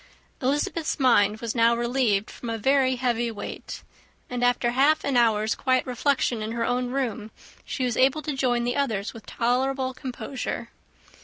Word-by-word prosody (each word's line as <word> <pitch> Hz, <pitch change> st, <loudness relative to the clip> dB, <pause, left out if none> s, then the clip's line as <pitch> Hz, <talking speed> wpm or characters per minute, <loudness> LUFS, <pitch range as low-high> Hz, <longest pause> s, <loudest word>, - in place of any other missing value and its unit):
Elizabeth's 295 Hz, +4 st, -1 dB
mind 215 Hz, -5 st, +3 dB
was 230 Hz, -2 st, -2 dB
now 230 Hz, 0 st, +4 dB
relieved 235 Hz, -4 st, 0 dB
from 235 Hz, -, -7 dB
a 225 Hz, -, -2 dB
very 265 Hz, +3 st, +3 dB
heavy 240 Hz, -2 st, 0 dB
weight; 220 Hz, -3 st, -7 dB, 0.5 s
and, 245 Hz, 0 st, -2 dB
after 245 Hz, -1 st, +2 dB
half 280 Hz, +5 st, +3 dB
an 280 Hz, -, -1 dB
hour's 220 Hz, -2 st, +3 dB
quiet 255 Hz, -1 st, +1 dB
reflection 250 Hz, -2 st, 0 dB
in 215 Hz, +1 st, -3 dB
her 230 Hz, 0 st, -1 dB
own 250 Hz, 0 st, 0 dB
room, 235 Hz, -5 st, -2 dB, 0.4 s
she 260 Hz, -, -2 dB
was 245 Hz, -2 st, -1 dB
able 275 Hz, +4 st, +3 dB
to 300 Hz, -, -2 dB
join 245 Hz, -3 st, +1 dB
the 245 Hz, +1 st, -1 dB
others 225 Hz, -8 st, -1 dB
with 225 Hz, -2 st, -12 dB
tolerable 260 Hz, +2 st, 0 dB
composure. 260 Hz, 0 st, -5 dB
245 Hz, 165 wpm, -25 LUFS, 230-265 Hz, 0.5 s, now